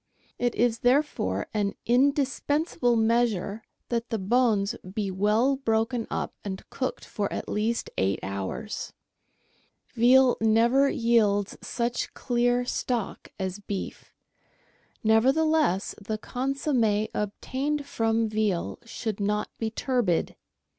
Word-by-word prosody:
It 245 -1 0
is 230 -1 +2
therefore 245 - +1
an 205 -2 0
indis 275 +3 +2
pensable 290 -5 +2
measure 225 -3 +1 0.3
that 235 0 -1
the 225 - -1
bones 215 -1 +2 0.2
be 200 -1 -2
well 215 +8 +2
broken 225 -2 0
up - - -3
and 190 -2 -6
cooked 260 - -3
for 205 -2 -3
at - - -4
least 220 +3 -1
eight 95 +1 +1
hours. 100 - -4 1.0
Veal 250 +2 +5
never 235 +5 +4
yields 215 -5 +2
such 235 0 -2
clear 245 0 +1
stock 245 -3 -3
as 190 +1 -3
beef; 200 -1 -6 0.9
nevertheless, 265 - +3
the 215 +2 -3
consomm^ 245 -4 0
obtained 275 +8 -2
from 225 -4 +1
veal 210 -5 -1
should 225 -2 -4
not 210 +1 -1
be 225 - -1
turbid. 230 -7 0
225 Hz, 115 wpm, -27 LUFS, 210-250 Hz, 1.0 s, Veal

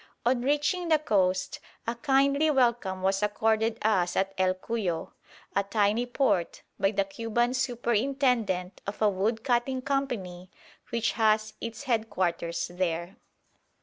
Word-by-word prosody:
On 245 0 +2
reaching 295 +6 +1
the 315 -1 +5
coast 190 -10 0 0.3
a 230 - -1
kindly 275 +4 +2
welcome 235 -9 +1
was 195 +1 +1
accorded 220 +2 +1
us 190 -5 +2
at 195 0 0
El 185 -1 +2
Cuyo, 185 -5 -3 0.4
a 200 - +4
tiny 210 +3 +1
port, 210 -9 0 0.2
by 195 - +3
the 200 -1 +1
Cuban 230 +4 -1
superintendent 240 -5 0
of 200 - -4
a 215 - +4
wood 215 +4 -1
cutting 255 +1 0
company 205 -11 -3 0.4
which 230 -1 0
has 215 -1 +2
its 230 +2 -6
headquarters 185 -9 -1
there. 175 +2 -2
220 Hz, 130 wpm, -28 LUFS, 190-245 Hz, 0.4 s, the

